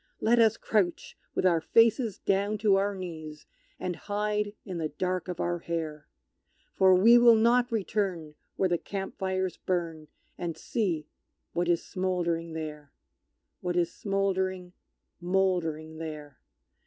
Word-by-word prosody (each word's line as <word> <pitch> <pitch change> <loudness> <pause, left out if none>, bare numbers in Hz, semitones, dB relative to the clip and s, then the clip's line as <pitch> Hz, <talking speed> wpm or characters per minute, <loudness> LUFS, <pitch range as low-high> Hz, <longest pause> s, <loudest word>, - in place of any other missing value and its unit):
Let 235 +2 +3
us 225 -1 +4
crouch 190 -6 -1 0.2
with - - 0
our 170 -3 +4
faces 230 - +3
down 200 +2 0
to 205 -2 +3
our 200 +1 +1
knees, 160 -5 -8 0.3
And 180 -1 -3
hide 210 +2 -2
in 185 -3 -5
the 155 -1 -2
dark 180 +3 -2
of 180 -2 -5
our 175 0 -1
hair; 160 -3 -4 0.7
For 190 -1 +5
we 230 +6 +7
will 240 -1 +7
not 240 +2 +3
return 190 -7 -2 0.2
where 190 - +2
the 175 -2 0
camp 195 -1 -6
fires 190 -2 -1
burn, 165 -4 -3 0.3
And 170 -2 -3
see 175 -7 -1 0.5
what 175 0 0
is 170 -1 +1
smouldering 175 -3 -2
there 150 -3 -6 0.7
What 175 -1 -3
is 170 -1 +1
smouldering, 190 -2 -1 0.5
mouldering 175 -4 0
there! 150 -4 -7
185 Hz, 140 wpm, -28 LUFS, 165-200 Hz, 0.7 s, we